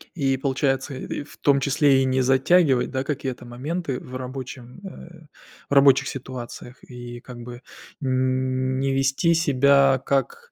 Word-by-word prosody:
И 135 -4 0
получается, 135 0 -1
и 130 - -5
в 145 - -16
том 140 -1 +3
числе 140 0 +3
и - - +1
не 130 0 +1
затягивать, 135 +1 +3
да, 130 0 -2
какие-то 135 -3 -4
моменты 135 +4 -4
в 130 - -10
рабочем, 130 +1 -8
э, 170 -3 -12 0.4
в - - -2
рабочих 140 -1 +5
ситуациях. 125 -1 -8
И 120 -1 -9
как 120 0 -11
бы 120 0 -9 0.4
н 130 0 0
не 135 0 0
вести 135 +5 +2
себя 140 -4 +3
как 470 - -2
135 Hz, 150 wpm, -23 LUFS, 130-140 Hz, 0.4 s, рабочих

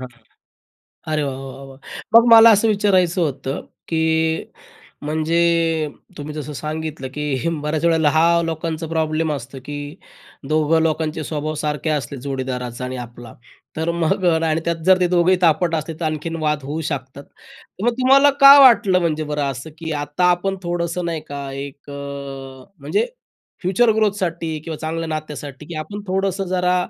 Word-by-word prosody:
हां. 130 - -7 1.1
अरे 150 -1 +1
वाह, 135 -2 -3
वाह, 135 0 -9
वाह! 135 0 -13 0.4
मग 230 - +8
मला 225 0 +9
असं 225 - +2
विचारायचं 190 -4 +2
होतं 135 -3 -2 0.3
की 160 -1 +1 1.0
म्हणजे 160 +2 0 0.8
तुम्ही 150 +1 -6
जसं 150 -1 -6
सांगितलं 155 -3 -5
की 150 - -3 0.4
बऱ्याच 155 +2 -1
वेळेला 160 -3 +3
हा 160 - +5 0.2
लोकांचा 160 0 -4
प्रॉब्लेम 160 0 0
असतो 135 0 -7
की 145 - -6 0.8
दोघं 155 +1 +3
लोकांचे 160 -1 -1
स्वभाव 155 0 -3
सारखे 150 +1 -2
असले, 140 -2 -2
जोडीदाराचा 125 -2 -4
आणि 130 0 -5
आपला, 120 -1 -13 0.4
तर 160 +2 -1
मग 180 +3 0
अ, 165 -2 +3
आणि 155 +1 0
त्यात 165 -1 -2
जर 185 0 +5
ते 180 - +3
दोघेही 180 +2 +4
तापट 165 0 +3
असले, 160 +1 -3
तर 170 - -2
आणखीन 155 +1 -3
वाद 150 -2 0
होऊ 150 +4 -4
शकतात. 130 +2 -7
तर 270 -7 -15
मग 240 - +4
तुम्हाला 275 +2 +6
का 280 +1 +11
वाटलं 225 -8 +6
म्हणजे 155 -3 -1
बरं 150 -1 -1
असं 135 +5 -8
की 160 -1 -5
आता 145 +5 -1
आपण 195 +2 -1
थोडंसं, 175 0 -2
नाही 165 -2 -3
का, 140 -1 -5
एक 140 +1 -8
अ, 140 - -7 0.9
म्हणजे 150 - 0 0.6
फ्युचर 195 +6 +2
ग्रोथसाठी 175 -7 -1
किंवा 160 -2 -5
चांगल्या 165 +1 -4
नात्यासाठी 150 -3 -6
की 170 - -8
आपण 205 +7 -6
थोडंसं 195 +1 -1
जरा 180 0 +1
160 Hz, 160 wpm, -20 LUFS, 150-175 Hz, 1.1 s, का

